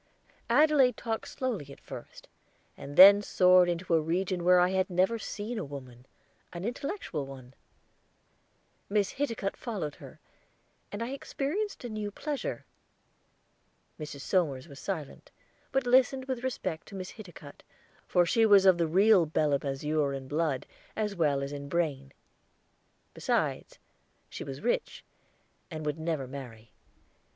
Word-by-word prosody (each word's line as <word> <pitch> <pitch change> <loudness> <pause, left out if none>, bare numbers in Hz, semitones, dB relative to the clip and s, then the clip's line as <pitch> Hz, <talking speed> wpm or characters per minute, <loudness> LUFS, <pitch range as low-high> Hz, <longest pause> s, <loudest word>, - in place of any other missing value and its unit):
Adelaide 270 -2 +4
talked 225 -1 -3
slowly 215 - -4
at - - -12
first, - - -11 0.5
and 145 +1 -9
then 200 +2 +10
soared 180 -2 +5
into 175 0 -2
a 165 - +4
region 175 +2 -1
where 180 +1 +6
I 180 0 +4
had 190 0 0
never 190 +6 +1
seen 215 +2 -5
a - - -3
woman 130 -3 -10 0.4
an 175 +2 -6
intellectual 240 - -4
one. 130 -2 -11 1.4
Miss 205 -1 +1
Hiticutt 230 -8 -2
followed 195 - -4
her, - - -13 0.7
and 205 +3 -4
I 235 - -4
experienced 295 +9 -3
a - - -4
new 215 -1 -4
pleasure. 290 +7 -4 1.3
Mrs. 150 -2 -7
Somers 155 -6 0
was 140 -3 -12
silent, 160 -8 -6 0.4
but 270 -1 0
listened 260 +1 +3
with 260 -2 -4
respect 240 -11 -3
to 200 - -10
Miss 185 -1 -6
Hiticutt, 175 -9 -12 0.5
for 175 -1 +3
she 225 +5 +2
was 200 -3 +6
of 185 -2 +6
the 165 - +2
real 190 +1 +5
Belem 150 -2 +1
azure 145 +1 -1
in 135 -1 -6
blood 150 -2 -1 0.3
as 210 -2 -2
well 145 -5 +1
as 140 - -5
in 140 -1 -7
brain; 140 -5 -1 1.0
besides, - - -1 0.5
she - - -6
was 135 -1 -7
rich, 240 +3 -2 0.7
and 155 -3 -6
would 150 +1 -2
never 160 -4 -2
marry. 125 -5 -10
180 Hz, 145 wpm, -29 LUFS, 145-220 Hz, 1.4 s, then